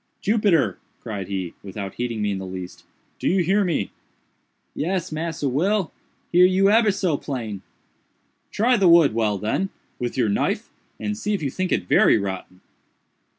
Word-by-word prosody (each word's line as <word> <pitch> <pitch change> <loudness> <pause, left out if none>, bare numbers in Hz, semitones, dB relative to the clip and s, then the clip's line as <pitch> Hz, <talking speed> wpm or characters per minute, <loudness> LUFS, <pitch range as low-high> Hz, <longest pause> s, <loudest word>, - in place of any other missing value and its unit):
"Jupiter," 205 -7 +2 0.2
cried 100 -5 -5
he, 95 -3 -4
without 100 -1 -6
heeding 115 -3 -3
me 105 - 0
in 95 - -3
the 95 - -6
least, 90 -1 -8 0.3
"do - - -2
you 185 0 +3
hear 195 +5 +2
me?" 165 - -1 0.8
"Yes, 180 +2 -2
Massa 155 -2 -2
Will, 180 +8 +1 0.4
hear 180 +1 +6
you 195 +2 +3
ebber 225 0 +5
so 190 -6 0
plain." 115 -10 -5 0.9
"Try 245 +3 +3
the 190 -4 +4
wood 170 -7 +6
well, 110 -3 +1
then, 110 - -1 0.3
with 120 +1 -3
your 120 -3 +2
knife, 100 - -1 0.3
and 105 -1 -2
see 205 - -1
if 190 - -5
you 135 - -1
think 185 +4 -2
it 90 - +1
very - - +5
rotten." 95 -2 -5
140 Hz, 165 wpm, -23 LUFS, -, 0.9 s, hear